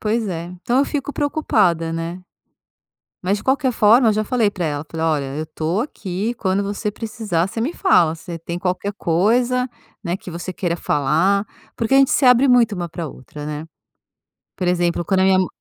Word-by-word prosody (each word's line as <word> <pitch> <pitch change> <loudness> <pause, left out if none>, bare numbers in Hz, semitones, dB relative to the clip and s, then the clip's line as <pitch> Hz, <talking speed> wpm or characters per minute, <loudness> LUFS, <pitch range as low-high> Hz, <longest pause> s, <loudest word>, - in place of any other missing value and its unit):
Pois 220 +1 0
é. 170 -2 -4 0.2
Então 245 +2 +1
eu 275 - +4
fico 290 0 -3
preocupada, 210 - +1
né. 165 +2 -4 1.0
Mas, 195 +3 +1
de - - -10
qualquer 265 0 +2
forma, 230 +2 +5
eu - - +2
já 215 +1 0
falei 225 -2 +1
para 180 -4 -3
ela, 145 0 -3
falei: 165 0 -2
“Olha, 150 -3 +1
eu 155 - -3
tô 160 +6 -2
aqui. 205 -4 -3
Quando 195 -1 0
você 205 +2 -2
precisar, 215 -7 -2
você 225 +3 -4
me 270 - 0
fala. 170 - +3
Você 165 +1 -8
tem 170 +1 -5
qualquer 185 +3 -2
coisa, 240 +10 +1 0.3
né, 175 0 -2
que 180 - -10
você 175 +2 -5
queira 175 -2 -1
falar.” 170 +7 +1 0.3
Porque 230 +3 -1
a - - +7
gente 275 -1 +5
se 275 - +3
abre 250 +2 +6
muito 240 -4 +4
uma 175 -2 -4
para 170 +2 -5
a - - -3
outra, 145 +2 -10
né. 150 +1 -5 0.9
Por 180 - -1
exemplo, 175 -1 +1
quando 190 +2 +2
a - - +4
minha 190 0 +4
ma 185 - +1
190 Hz, 205 wpm, -20 LUFS, 170-230 Hz, 1.0 s, a